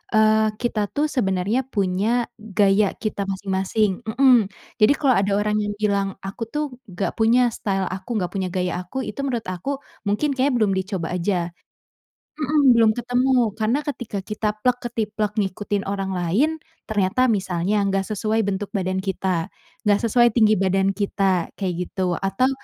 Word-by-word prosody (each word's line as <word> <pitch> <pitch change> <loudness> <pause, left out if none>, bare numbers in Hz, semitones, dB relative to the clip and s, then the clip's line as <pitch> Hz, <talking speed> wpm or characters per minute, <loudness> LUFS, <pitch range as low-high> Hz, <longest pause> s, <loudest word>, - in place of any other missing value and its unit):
eee, 215 0 +4
kita 215 -2 -1
tuh 300 +1 -1
sebenarnya 205 +2 0
punya 210 +2 +1 0.2
gaya 200 -1 +2
kita 205 -3 -3
masing-masing, 195 +1 0
mhm, 245 -2 +5 0.3
jadi 215 +7 +7
kalau 270 -4 +3
ada 200 +1 0
orang 210 +1 +1
yang 205 0 -3
bilang 200 -2 0
aku 215 +4 -5
tuh 300 +3 -1 0.3
gak 185 +1 -2
punya 240 +2 +4
style 195 -3 -1
aku 195 +6 -5
gak 180 -4 -2
punya 190 -2 -1
gaya 180 -1 -2
aku 220 +9 -5
itu - - -7
menurut 240 -4 -2
aku 270 +11 -3 0.3
mungkin 280 +9 +1
kayaknya 270 +1 +1
belum 215 -4 +2
dicoba 190 -2 -2
aja, 180 -1 -1 0.9
mhm, 295 -3 +4
belum 225 -1 +6
ketemu 245 +2 +1 0.3
karena 225 +6 +2
ketika 245 -8 -4
kita 210 0 -2 0.2
plek-ketiplek 225 -4 -1
ngikutin 200 0 -1
orang 195 -1 -3
lain, 205 - +1 0.3
ternyata 215 +5 +2
misalnya 195 -1 0
nggak 195 0 -1
sesuai 215 +1 0
bentuk 200 +1 -3
badan 190 -2 -1
kita, 190 -2 -1 0.3
nggak 205 -1 +3
sesuai 240 0 +4
tinggi 215 -2 +4
badan 195 +1 +1
kita 195 -3 0
kayak 185 -3 -1
gitu 180 -2 -1
atau 195 +9 +1
205 Hz, 155 wpm, -22 LUFS, 190-235 Hz, 0.9 s, jadi